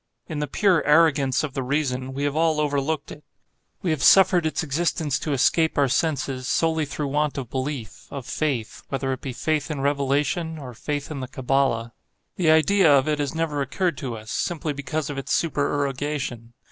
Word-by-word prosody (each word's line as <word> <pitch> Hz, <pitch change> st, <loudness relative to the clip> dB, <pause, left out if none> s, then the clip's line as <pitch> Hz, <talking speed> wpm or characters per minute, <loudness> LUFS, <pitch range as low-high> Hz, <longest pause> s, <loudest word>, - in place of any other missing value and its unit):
In 155 Hz, -3 st, -4 dB
the 150 Hz, -, -1 dB
pure 180 Hz, +2 st, +2 dB
arrogance 150 Hz, -4 st, +3 dB
of 145 Hz, -4 st, -4 dB
the 135 Hz, -, -2 dB
reason, 130 Hz, -1 st, -1 dB
we 140 Hz, +2 st, -4 dB
have 145 Hz, 0 st, 0 dB
all 160 Hz, -1 st, +2 dB
overlooked 145 Hz, 0 st, -1 dB
it. 150 Hz, -, -10 dB, 0.6 s
We 175 Hz, -, +1 dB
have 155 Hz, -4 st, -1 dB
suffered 180 Hz, -2 st, +6 dB
its 155 Hz, 0 st, -2 dB
existence 160 Hz, -1 st, 0 dB
to 155 Hz, -, -3 dB
escape 160 Hz, +4 st, +2 dB
our 140 Hz, -1 st, +4 dB
senses, 135 Hz, -2 st, -1 dB
solely 160 Hz, -1 st, +1 dB
through 145 Hz, 0 st, -4 dB
want 150 Hz, +1 st, 0 dB
of 130 Hz, -4 st, -5 dB
belief—of 130 Hz, -1 st, -5 dB
faith;—whether 135 Hz, -1 st, -2 dB
it 130 Hz, -, -7 dB
be 135 Hz, -, -4 dB
faith 150 Hz, +4 st, -1 dB
in 150 Hz, -3 st, -3 dB
Revelation, 145 Hz, +4 st, 0 dB
or 130 Hz, -4 st, -8 dB
faith 145 Hz, +5 st, -4 dB
in 145 Hz, -, -4 dB
the 130 Hz, -, -5 dB
Kabbala. 130 Hz, -3 st, 0 dB, 0.4 s
The 170 Hz, -4 st, +1 dB
idea 160 Hz, +2 st, +5 dB
of 135 Hz, -1 st, +4 dB
it 150 Hz, -1 st, 0 dB
has 145 Hz, +1 st, -2 dB
never 160 Hz, -3 st, -1 dB
occurred 145 Hz, +5 st, -1 dB
to 120 Hz, -4 st, -4 dB
us, 110 Hz, +1 st, -9 dB
simply 165 Hz, -3 st, -2 dB
because 145 Hz, +2 st, -3 dB
of 140 Hz, -, -4 dB
its 135 Hz, -, -1 dB
supererogation. 140 Hz, -5 st, -2 dB
145 Hz, 185 wpm, -24 LUFS, 135-155 Hz, 0.6 s, suffered